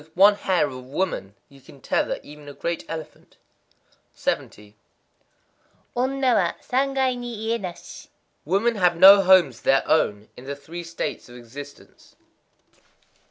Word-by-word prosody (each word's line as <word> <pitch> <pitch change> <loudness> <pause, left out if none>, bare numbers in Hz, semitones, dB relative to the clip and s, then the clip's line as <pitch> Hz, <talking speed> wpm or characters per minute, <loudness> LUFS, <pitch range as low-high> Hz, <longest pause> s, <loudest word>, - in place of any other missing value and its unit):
_ - - -15
With 160 +2 -27
one 200 +2 +7
hair 190 -5 0
of 140 - -6
a 130 - -8
woman 130 - -4
you 140 -1 -19
can 135 - -17
tether - - -1
even 150 0 -12
a - - -9
great 170 +3 -4
elephant. 160 -2 -9 0.8
70.—Onna 245 - -5
wa 185 -6 +2
Sangai 265 0 0
ni 240 -2 -6
iyé 230 -1 -1
nashi. 180 -3 -9 0.4
Women 205 +8 0
have 180 -3 +3
no 195 +3 +9
homes 180 -10 +4
of - - -24
their 135 - +3
own 105 -9 +1
in 125 - -13
the 140 +1 -5
Three 170 +5 -9
States 165 -6 -5
of 120 - -13
Existence. 135 +4 -13
170 Hz, 150 wpm, -23 LUFS, 140-205 Hz, 0.8 s, no